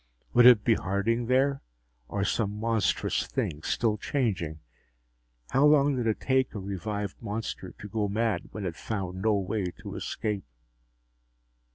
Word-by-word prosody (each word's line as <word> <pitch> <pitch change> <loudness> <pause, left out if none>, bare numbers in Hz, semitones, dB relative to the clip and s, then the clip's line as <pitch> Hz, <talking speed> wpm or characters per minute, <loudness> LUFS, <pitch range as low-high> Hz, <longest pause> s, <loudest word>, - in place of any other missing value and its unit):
Would 120 0 +8
it 120 -5 +8
be 115 - +4
Harding 110 +5 0
there 135 +2 +2 0.5
or 100 -1 -2
some 105 0 -1
monstrous 115 -2 0
thing 75 -1 -2
still 110 +5 0
changing? 95 - -1 0.9
How 135 - +3
long 145 -1 +5
did 120 -3 -1
it 110 - 0
take 130 -3 +1
a - - -3
revived 100 +1 -4
monster 110 0 -5
to 105 - -8
go 105 0 -1
mad 105 -3 -1
when 105 -2 -5
it 85 -3 -3
found 95 -3 -4
no 110 0 +3
way 100 +1 -1 0.2
to - - -6
escape? 105 -3 -3
105 Hz, 150 wpm, -28 LUFS, 100-115 Hz, 0.9 s, Would